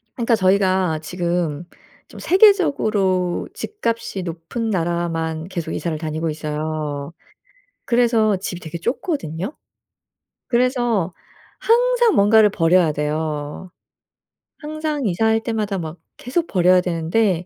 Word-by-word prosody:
그러니까 235 -1 +2
저희가 185 -4 +2
지금 170 -1 -2 0.4
좀 - - -12
세계적으로 215 - +3
집값이 230 - -3
높은 175 +7 -4
나라만 165 -3 -2
계속 170 -4 -4
이사를 165 -3 -2
다니고 160 +1 -3
있어요. 150 -1 -4 0.7
그래서 230 -4 +3
집이 180 -1 -5
되게 165 0 -7
좁거든요. 235 - -3 0.9
그래서 240 - +1 0.5
항상 480 0 +3
뭔가를 210 +1 +5
버려야 170 -3 +3
돼요. 150 +2 -3 0.9
항상 305 -3 -3
이사할 220 +4 +2
때마다 215 -4 -2
막 160 -1 -6 0.2
계속 325 +7 -2
버려야 180 -1 +4
되는데 175 +2 0
185 Hz, 260 characters per minute, -21 LUFS, 165-230 Hz, 0.9 s, 뭔가를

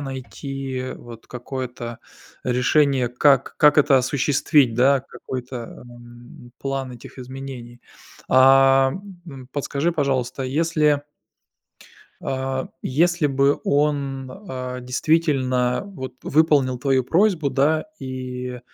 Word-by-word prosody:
найти 135 -1 -5
вот 115 -1 -12
какое-то 125 -2 -6 0.5
решение, 130 +1 +2
как 135 +2 +2
как 150 -1 +5
это 140 -2 +5
осуществить, 135 -1 +2
да? 135 +3 +4
Какой-то, 125 -1 -7
м, 120 0 -14
план 135 -2 -3
этих 120 +2 -13
изменений. 125 -2 -9 0.5
А, 135 0 +6 0.3
м, 135 -5 -10
подскажи, 145 +3 -1
пожалуйста, 135 -4 -1
если 150 +1 +1 1.2
а, 130 0 -3
если 170 +3 +2
бы 140 +1 +2
он, 140 -2 0 0.2
а, 125 -1 -5
действительно 130 -2 +1
вот 130 -11 -8
выполнил 145 -4 +2
твою 130 0 +1
просьбу, 170 - +2
да, 155 +5 +1
и, 125 -1 -6
135 Hz, 100 wpm, -22 LUFS, 125-145 Hz, 1.2 s, А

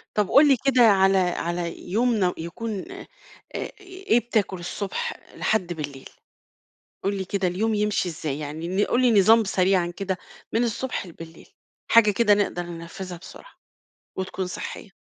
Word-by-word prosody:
طب 210 -2 +1
قل 295 +2 +7
لي 270 -3 +5
كده، 260 -2 +4
على 195 -3 +5
على 175 -1 -2
يوم 220 -4 +2
يكون، 190 +5 -5 0.7
إيه 375 - -1
بتأكل، 215 -6 -1
الصبح 205 - -4 0.2
لحد 180 -5 0
بالليل؟ 145 -4 -7 0.9
قل 200 +1 0
لي 190 - -3
كده 190 0 -1
اليوم 215 +5 0
يمشي 210 -3 0
إزاي؟ 150 -3 -4
يعني 165 +7 -2
قل 250 - +1
لي 235 -5 +5
نظام 220 +3 +6
سريعًا 185 -2 +1
كده، 190 -2 -2 0.4
من 230 - +2
الصبح 240 -1 -2
لبليل، 165 -1 -12 0.4
حاجة 230 -2 +7
كده 210 0 +4
نقدر 200 -3 0
ننفذها 175 +1 -8
بسرعة، - - -13 0.6
وتكون 190 0 -3
صحية. 190 +3 -7
195 Hz, 140 wpm, -24 LUFS, 175-225 Hz, 0.9 s, قل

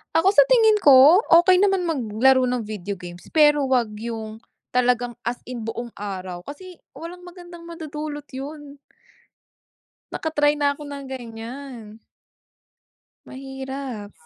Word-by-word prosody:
Ako 375 +5 +4
sa - - +7
tingin 450 -3 +5
ko, 285 +6 +7 0.2
okey 370 +1 +4
naman 390 -3 +2
maglaro 260 -3 +2
ng 245 -3 -2
video 205 -2 -6
games 175 0 -11
pero 295 -3 +3
wag 235 -5 +1
yung 225 -1 -6 0.3
talagang 245 -1 +1
as 240 +1 -3
in 250 -2 -7
buong 230 +1 -6
araw, 185 -3 -6
kasi 360 +4 -11 0.2
walang 345 +2 -9
magandang 350 -1 -12
madudulot 305 -3 -7
yun. 285 +1 -8 1.3
Naka-try 295 -2 0
na 285 -1 +1
'ko 290 - -15
ng 280 -1 -7
ganiyan. 235 -2 -9 1.3
Mahirap, 265 -5 -7
265 Hz, 120 wpm, -22 LUFS, 230-310 Hz, 1.3 s, sa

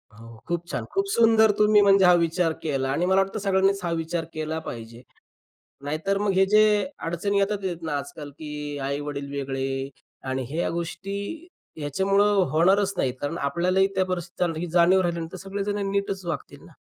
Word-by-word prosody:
हो 115 +2 -13 0.2
खूप 175 0 -2
छान. - - -3
खूप 390 +1 +1
सुंदर 225 -2 +5
तुम्ही 210 0 +5
म्हणजे 195 -1 +5
हा 180 - +7
विचार 165 0 +1
केला 135 -4 -1
आणि 160 +6 0
मला 190 +1 +4
वाटतं 195 +3 -3
सगळ्यांनीच 195 0 +2
हा 170 - -1
विचार 165 0 -2
केला 155 0 -3
पाहिजे. 115 0 -8 0.8
नाहीतर 160 +7 -1
मग 205 -1 +1
हे 190 +1 +4
जे 210 +2 +5 0.4
अडचणी 185 +5 0
येतात 200 +1 +1 0.2
ना, 160 -3 -2
आजकाल 145 0 -8
की 150 -1 -6
आई-वडील 140 0 -4
वेगळे 135 -1 -3 0.4
आणि 130 0 -2
ह्या 165 +4 -1
गोष्टी 170 +4 -4 0.6
ह्याच्यामुळं 195 +8 +2 0.2
होणारच 190 +5 +3
नाहीत, 130 -7 0
कारण 145 +4 -3
आपल्यालाही 180 +7 +2
त्या 190 - +2
परिस्थिती, 175 -2 -2
ही 175 - -2
जाणीव 175 +2 +5
राहिल्यानंतर 170 -1 -2
सगळेजण 200 +2 -3
नीटच 195 -1 -2
वागतील 160 -5 -5
ना? - - -16
175 Hz, 165 wpm, -25 LUFS, 150-195 Hz, 0.8 s, हा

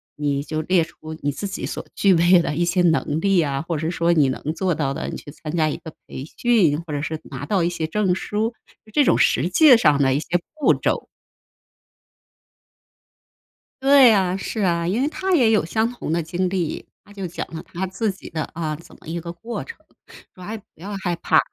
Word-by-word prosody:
你 145 -1 -1
就 155 +1 -3
列 175 +1 +2
出 160 0 -10
你 145 - 0
自 200 +9 -4
己 190 - -4
所 - - -5
具 195 -2 +4
备 175 +2 +6
的 150 - -2
一 175 - +1
些 175 +1 +1
能 160 -3 +2
力 195 0 +3
啊， 140 -3 -1
或 165 0 -3
者 160 +2 -2
说 170 -1 +2
你 150 -5 +4
能 130 - -4
做 185 -1 0
到 150 -3 -1
的， - - -4
你 - - -5
去 145 - -10
参 155 +1 -7
加 155 -1 +3
一 - - -2
个 160 - -10 0.2
培 130 - -7
训， 190 -11 +3
或 150 - -5
者 145 - -2
是 155 +1 -3
拿 - - -7
到 200 -4 +1
一 170 - +2
些 165 -2 -3
证 190 +1 +1
书， 215 +4 -2 0.4
这 295 - +5
种 - - +3
实 155 +8 +2
际 280 - +7
上 150 -10 +4
的 135 -1 +3
一 140 - +1
些 170 +3 -1 0.2
步 305 - +4
骤。” - - -1 2.8
对 270 -3 +7
啊， 190 -2 +1
是 215 +3 -4
啊。 170 -3 +1
因 205 +8 0
为 280 - +2
他 380 +3 -2
也 240 -8 +4
有 215 -7 +3
相 220 +7 0
同 245 -10 -5
的 170 0 0
经 175 +3 -1
历， 180 -4 -3 0.2
他 - - -19
就 195 -2 -5
讲 170 - -5
了 160 - -5
他 185 +3 -4
自 195 +3 -1
己 190 - -11
的 155 -1 -3
啊， 160 -2 -3
怎 170 - -16
么 - - -17
一 170 +2 -3
个 170 0 -6
过 225 +7 -6
程， 470 - -10 0.6
说： 185 - -12
“哎， 215 +5 -5
不 210 - -17
要 200 +5 -7
害 175 -2 0
怕。” - - +3
175 Hz, 240 characters per minute, -22 LUFS, 160-205 Hz, 2.8 s, 际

